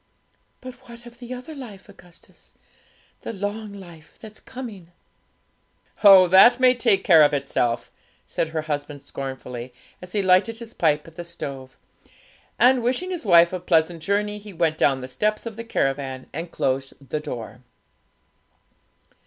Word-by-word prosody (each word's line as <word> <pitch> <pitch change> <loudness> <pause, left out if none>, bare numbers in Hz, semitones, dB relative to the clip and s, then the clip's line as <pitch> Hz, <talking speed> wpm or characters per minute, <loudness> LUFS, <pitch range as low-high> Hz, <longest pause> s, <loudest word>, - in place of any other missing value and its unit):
'But 255 0 -8 0.2
what 235 0 -11
of 240 0 -14
the 245 0 -10
other 255 +5 -7
life, 225 -9 -11
Augustus 180 -4 -19 0.7
the - - -5
long 205 +1 -5
life 175 -6 -13
that's 215 -1 -11
coming?' 220 -10 -10 1.1
'Oh, 195 -3 +9
that 195 +8 +7
may 255 -1 +5
take 235 -5 +1
care 165 -4 +6
of 145 -1 +4
itself!' 125 -4 -1 0.3
said 165 - -2
her 160 -1 -3
husband 145 -1 -5
scornfully, 130 -2 -7 0.3
as 180 0 -11
he 205 -2 0
lighted 190 +5 +3
his 230 0 -10
pipe 150 -2 +1
at 165 - -16
the 175 - -5
stove; 135 -6 -8 0.8
and, 250 +1 +4
wishing 260 +11 -1
his 345 - -5
wife 170 -1 +6
a 185 - -2
pleasant 165 -1 +1
journey, 205 +3 -1
he 205 -1 -12
went 160 -2 0
down 135 -2 +2
the 130 - -6
steps 210 - -2
of 230 -2 -6
the 230 - -7
caravan 135 - -2
and 165 +3 -5
closed 135 -2 -2 0.2
the 155 - -1
door. 120 -5 -7
180 Hz, 155 wpm, -23 LUFS, 150-220 Hz, 1.1 s, Oh